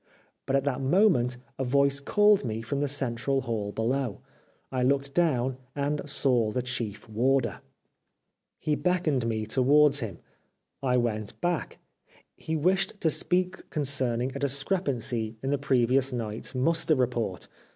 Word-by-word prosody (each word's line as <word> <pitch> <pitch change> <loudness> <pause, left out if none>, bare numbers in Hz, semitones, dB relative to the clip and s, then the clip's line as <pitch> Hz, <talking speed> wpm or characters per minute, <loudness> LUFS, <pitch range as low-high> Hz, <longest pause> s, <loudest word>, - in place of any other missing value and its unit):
But 135 - +1
at 135 - +2
that 135 -2 -1
moment 135 - +3 0.2
a - - 0
voice 140 +2 +2
called 210 +6 +3
me 115 -2 -3
from 140 +4 -3
the 145 - 0
central 135 -1 0
hall 110 -5 -3
below. 120 +1 -1 0.5
I 130 -1 -1
looked 140 +2 +1
down, 135 -7 +1 0.2
and 145 +1 -1
saw 125 -5 +2
the 125 +3 -2
Chief 120 -4 -4
Warder. 120 0 0 1.0
He 155 - -1
beckoned 155 -8 0
me 110 -1 -2
towards 140 +5 +4
him. 105 - -5 0.6
I 125 -2 +1
went 110 -4 -2
back. 175 -2 -2 0.6
He 160 - -4
wished 190 +6 +1
to 160 - +2
speak 180 +4 0
concerning 130 -4 0
a 140 - -5
discrepancy 135 - -1
in 135 - -1
the 145 - 0
previous 130 0 +2
night's 115 0 -3
muster 160 +4 +2
report. 120 -7 -1
135 Hz, 140 wpm, -27 LUFS, 120-145 Hz, 1.0 s, towards